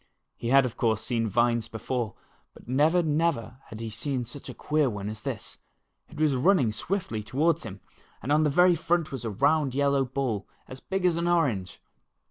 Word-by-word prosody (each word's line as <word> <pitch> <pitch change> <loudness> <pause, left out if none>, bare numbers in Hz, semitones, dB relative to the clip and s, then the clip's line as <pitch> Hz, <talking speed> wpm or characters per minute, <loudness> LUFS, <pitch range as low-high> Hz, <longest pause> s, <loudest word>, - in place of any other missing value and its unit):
He 115 - -6
had, 135 +2 +5
of 125 - -5
course, 110 -3 +1
seen 115 -1 -1
vines 120 +1 +1
before, 115 -1 -3 0.4
but - - -16
never, 155 +8 +3
never 150 -7 0
had 110 - -9
he 115 -1 -5
seen 125 +3 -2
such 130 +4 -10
a - - -6
queer 150 -2 +1
one 105 -2 -5
as 110 0 -9
this. - - -6 0.5
It - - -11
was 155 -2 +3
running 135 - +3
swiftly 115 - -3
toward 145 +9 +1
him, 95 +1 -8 0.4
and 135 - -4
on 150 +1 +4
the 155 - +3
very 180 +5 +5
front 170 -1 0
was 130 -4 -5
a - - -1
round 140 +5 +1
yellow 140 -1 +2
ball, 125 -6 -2 0.2
about - - -21
as 130 - -7
big 190 +4 -3
as 175 -2 +3
an 170 +1 0
orange 135 - 0
130 Hz, 200 wpm, -27 LUFS, 115-155 Hz, 0.5 s, had